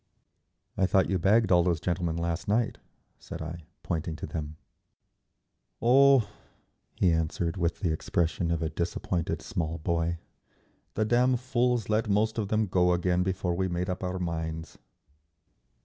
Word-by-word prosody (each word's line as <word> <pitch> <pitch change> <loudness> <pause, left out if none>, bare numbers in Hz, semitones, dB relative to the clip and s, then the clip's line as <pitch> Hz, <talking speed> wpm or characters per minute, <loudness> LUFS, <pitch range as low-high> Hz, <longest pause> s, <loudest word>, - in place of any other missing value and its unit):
"I 95 - +3
thought 95 0 +2
you 95 - +1
bagged 105 +5 +3
all 90 -1 +6
those 85 -2 +1
gentlemen 85 -1 -1
last 85 +4 -2
night," 110 +3 +1 0.4
said - - -8
I, 80 0 -7 0.2
pointing 80 -1 -2
to 75 - -6
them. 75 -1 -5 1.2
"Oh," 130 -1 +5 0.7
he 90 - +3
answered, 80 +2 -1
with 85 -2 -1
the 85 -5 +1
expression 85 +1 -1
of 85 -1 0
a 80 - -1
disappointed 85 0 -2
small 80 -1 -3
boy. 85 +1 -1 0.8
"The 110 - +1
damn 125 +3 +3
fools 125 -3 0
let 110 0 0
most 110 +3 +1
of 105 - -1
them 110 +1 +1
go 90 -2 +2
again 90 0 +1
before 95 -1 -1
we 95 +2 0
made 90 +1 -2
up 90 +1 -5
our 90 0 -2
minds…." 80 -2 -4
90 Hz, 150 wpm, -28 LUFS, 85-105 Hz, 1.2 s, all